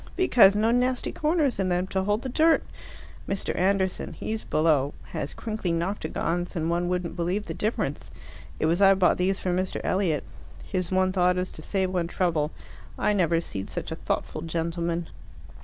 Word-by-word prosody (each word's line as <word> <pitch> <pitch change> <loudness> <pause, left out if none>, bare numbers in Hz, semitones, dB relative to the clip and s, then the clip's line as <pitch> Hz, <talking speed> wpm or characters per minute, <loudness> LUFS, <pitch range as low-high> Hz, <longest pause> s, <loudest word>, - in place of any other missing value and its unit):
"Because 240 - +6
no 220 +2 +3
nasty 250 +1 +1
corners 300 - +1
in 190 -1 +1
them 180 +1 +1
to 190 - 0
hold 205 +3 0
the 260 - -3
dirt. 320 +5 +4 0.7
Mr. 195 0 -2
Anderson 190 0 0
he's 220 0 -4
below 150 -3 +2
has 140 - -5
crinkly 215 -6 -3
noctagons, 175 0 -2
and 165 0 0
one 175 +1 0
wouldn't 180 -2 -2
believe 180 +5 -1
the - - -5
difference. 215 +2 -2 0.5
It - - +1
was 170 +4 +2
I 195 0 +7
bought 185 -2 +3
these 190 +2 +1
for 185 - -1
Mr. 185 +1 -1
Elliot. 180 -6 +1 0.4
His 185 -3 -2
one 185 0 +2
thought 180 -1 +2
is 180 0 -2
to - - -10
save 190 +2 -1
one 175 -2 0
trouble. 165 -4 0 0.5
I 210 - +2
never 170 -4 +2
seed 100 -12 -6
such - - -5
a - - -2
thoughtful - - -3
gentleman. 170 0 -2
185 Hz, 175 wpm, -26 LUFS, 170-205 Hz, 0.7 s, I